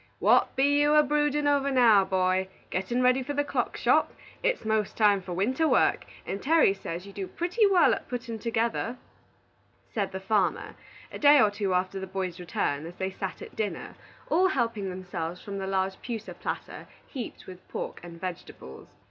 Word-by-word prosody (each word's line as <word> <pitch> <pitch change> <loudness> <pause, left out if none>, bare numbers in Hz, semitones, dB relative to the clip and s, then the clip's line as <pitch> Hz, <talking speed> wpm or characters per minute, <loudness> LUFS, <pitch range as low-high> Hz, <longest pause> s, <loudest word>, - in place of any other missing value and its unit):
"What - - +3
be 285 +2 +3
you 295 +1 +4
a 300 - +7
brewdin' 295 0 +1
over 280 -1 +2
now, 235 -7 +5
boy? 185 0 +1 0.2
Gettin' 215 +7 -1
ready 250 +1 +4
for 280 +3 -4
the 290 - +2
clock - - -2
shop? - - +3 0.3
It's - - 0
'most 220 -2 0
time 205 -3 +4
for 180 -1 -6
winter 255 - +1
work, - - +2 0.2
and 195 - -4
Terry 315 -8 +4
says 180 -2 -6
you 200 - -11
do 195 -1 -5
pretty 360 - +1
wal 380 -3 +5
at - - -5
puttin' 240 -2 -5
together," 230 +2 -1 1.0
said 200 -4 -1
the 190 - -5
farmer, 195 -1 0 0.4
a - - -7
day 290 0 +7
or 215 -5 +4
two 200 -2 -1
after 185 +1 -1
the 190 - -6
boy's 185 -1 -4
return, 160 -3 -2
as 175 - -10
they 190 +1 -3
sat 190 0 -6
at - - -12
dinner, 215 -2 -4 0.3
all 365 +4 +3
helping 230 - -1
themselves 180 -2 -5
from 200 -1 -6
the 190 - -4
large 190 0 -1
pewter 230 -2 -5
platter - - -6 0.2
heaped 250 -6 -7
with 185 0 -12
pork - - -5
and 170 -1 -11
vegetables. 170 - -8
205 Hz, 185 wpm, -27 LUFS, 190-265 Hz, 1.0 s, a